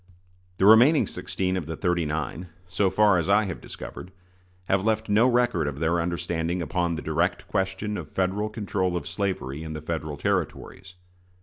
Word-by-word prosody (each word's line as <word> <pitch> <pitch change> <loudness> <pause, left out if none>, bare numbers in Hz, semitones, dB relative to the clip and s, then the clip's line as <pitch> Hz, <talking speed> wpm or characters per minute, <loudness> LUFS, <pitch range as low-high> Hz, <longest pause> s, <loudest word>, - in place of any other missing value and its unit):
The 95 - +2
remaining 120 +9 +7
sixteen 95 0 -3
of 85 -5 -3
the 80 - -4
"thirty 90 -2 0
nine," 80 +3 -3 0.2
so 95 +2 +1
far 100 -1 +4
as 85 - -2
I 105 +2 +5
have 95 -4 -5
discovered, 90 - -9 0.5
have 95 +1 +1
left 110 0 0
no 110 +4 +5
record 120 - +2
of 70 -2 -4
their 85 +2 +1
understanding 85 0 -2
upon 85 +1 -1
the 80 - -6
direct 85 +4 -1
question 95 +2 -2
of 80 -4 -7
Federal 95 +3 -1
control 95 -4 -1
of 75 -4 -6
slavery 85 -8 -3
in 80 -1 -6
the 75 - -5
Federal 80 -2 -4
Territories. 95 +5 -3
90 Hz, 175 wpm, -26 LUFS, 80-100 Hz, 0.5 s, remaining